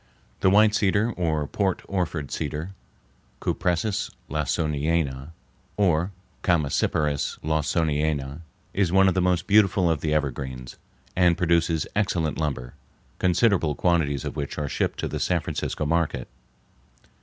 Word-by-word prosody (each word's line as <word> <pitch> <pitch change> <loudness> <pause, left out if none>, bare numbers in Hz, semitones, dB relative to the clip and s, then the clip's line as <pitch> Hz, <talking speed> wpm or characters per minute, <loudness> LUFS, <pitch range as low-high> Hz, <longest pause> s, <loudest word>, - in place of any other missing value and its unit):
The 95 - +4
white 105 +2 +5
cedar, 105 +2 +2
or 80 -6 -1
Port 95 +4 -1
Orford 85 -6 -2
cedar 75 +4 -3 0.7
(Cupressus 100 +4 -1 0.2
Lawsoniana, 75 -2 -1 0.5
or 90 -2 +2 0.3
Chamæcyparis 75 -3 +1
Lawsoniana), 75 -2 0 0.3
is 95 -4 +1
one 95 +1 +5
of 95 - +3
the 95 - +1
most 90 -1 +1
beautiful 100 -4 +4
of 80 - -1
the 80 - -1
evergreens, 65 -4 -3 0.4
and 90 -2 +4
produces 85 -3 +2
excellent 85 -7 0
lumber, 70 -6 -3 0.5
considerable 90 -4 +2
quantities 80 -6 +1
of - - -4
which 70 -2 -4
are 75 -1 -2
shipped - - -1
to - - -1
the - - -4
San - - +1
Francisco 75 - -3
market. 85 +1 0
80 Hz, 125 wpm, -25 LUFS, 75-90 Hz, 0.7 s, white